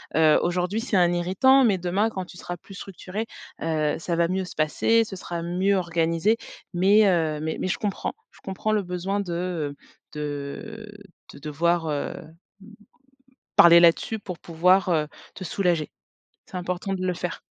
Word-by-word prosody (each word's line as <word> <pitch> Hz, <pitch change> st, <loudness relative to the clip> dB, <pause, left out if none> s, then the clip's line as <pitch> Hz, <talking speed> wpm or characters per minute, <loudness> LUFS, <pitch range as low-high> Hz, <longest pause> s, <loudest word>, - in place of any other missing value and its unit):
Heu, 155 Hz, -1 st, +5 dB
aujourd'hui 180 Hz, +4 st, 0 dB
c'est 230 Hz, -3 st, -2 dB
un 175 Hz, -1 st, +4 dB
irritant, 190 Hz, +10 st, +4 dB
mais 205 Hz, -5 st, +3 dB
demain 185 Hz, +5 st, 0 dB
quand 190 Hz, -4 st, -4 dB
tu 180 Hz, -, -14 dB
seras 175 Hz, -, -6 dB
plus 195 Hz, -, -14 dB
structuré, 195 Hz, +2 st, -6 dB, 0.4 s
heu, 155 Hz, -2 st, 0 dB
ça 170 Hz, +1 st, -2 dB
va 170 Hz, 0 st, +2 dB
mieux 190 Hz, +1 st, -1 dB
se -, -, -10 dB
passer, 225 Hz, +9 st, +2 dB
ce 215 Hz, -3 st, -8 dB
sera 170 Hz, -2 st, -5 dB
mieux 185 Hz, +4 st, +1 dB
organisé 170 Hz, +3 st, +1 dB, 0.4 s
mais 200 Hz, +4 st, +5 dB
heu, 160 Hz, -4 st, +1 dB
mais 160 Hz, 0 st, -3 dB
mais -, -, -1 dB
je -, -, -1 dB
comprends. 205 Hz, -2 st, -2 dB, 0.2 s
Je -, -, -20 dB
comprends 195 Hz, +3 st, -3 dB
le 210 Hz, -, +1 dB
besoin 180 Hz, +2 st, -2 dB
de, 185 Hz, -4 st, -3 dB
heu, 170 Hz, -5 st, -3 dB, 0.4 s
de 150 Hz, +10 st, -6 dB, 0.4 s
de -, -, -12 dB
devoir, 165 Hz, +3 st, 0 dB
heu, 145 Hz, -1 st, -2 dB
m 160 Hz, -, -13 dB, 1.2 s
parler 170 Hz, 0 st, +9 dB
là 170 Hz, -, +9 dB
dessus 220 Hz, +6 st, -5 dB
pour 180 Hz, -4 st, -7 dB
pouvoir, 180 Hz, +3 st, +3 dB
heu, 155 Hz, -3 st, +1 dB, 0.3 s
te -, -, -7 dB
soulager. 175 Hz, -3 st, 0 dB, 0.6 s
C'est 185 Hz, -, -9 dB
important 180 Hz, +2 st, -3 dB
de 185 Hz, -1 st, -3 dB
le 180 Hz, -, 0 dB
faire. 175 Hz, 0 st, -4 dB
180 Hz, 180 wpm, -25 LUFS, 165-195 Hz, 1.2 s, parler